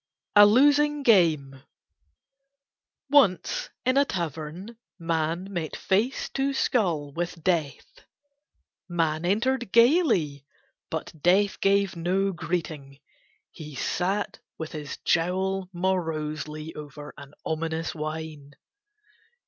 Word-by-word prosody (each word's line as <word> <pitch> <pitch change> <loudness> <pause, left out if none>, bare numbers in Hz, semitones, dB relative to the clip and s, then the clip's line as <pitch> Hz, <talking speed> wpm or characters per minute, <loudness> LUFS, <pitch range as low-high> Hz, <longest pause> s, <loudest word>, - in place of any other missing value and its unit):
A 205 0 +9
LOSING 290 +5 +4
GAME 155 - +3 1.5
Once 215 - +3 0.2
in 255 +2 +2
a 280 - +5
tavern 170 - -5 0.2
Man 165 +2 -2
met 170 -3 -3
face 215 +8 0
to 275 0 -1
skull 170 - 0
with 170 0 -4
Death. 165 -6 -2 0.9
Man 165 -1 0
entered 235 +4 0
gaily 230 - +3 0.5
but - - -5
Death 195 +4 +3
gave 200 -1 +2
no 185 +4 0
greeting, 155 -6 -4 0.5
he 150 -3 -10
sat 190 +9 -2 0.2
with 160 -1 -6
his 150 -2 -6
jowl 185 +2 0
morosely 155 -4 -3
over 150 0 -9
an 140 0 -13
ominous 160 +1 -2
wine. 155 -2 -6
175 Hz, 100 wpm, -26 LUFS, 155-200 Hz, 1.5 s, A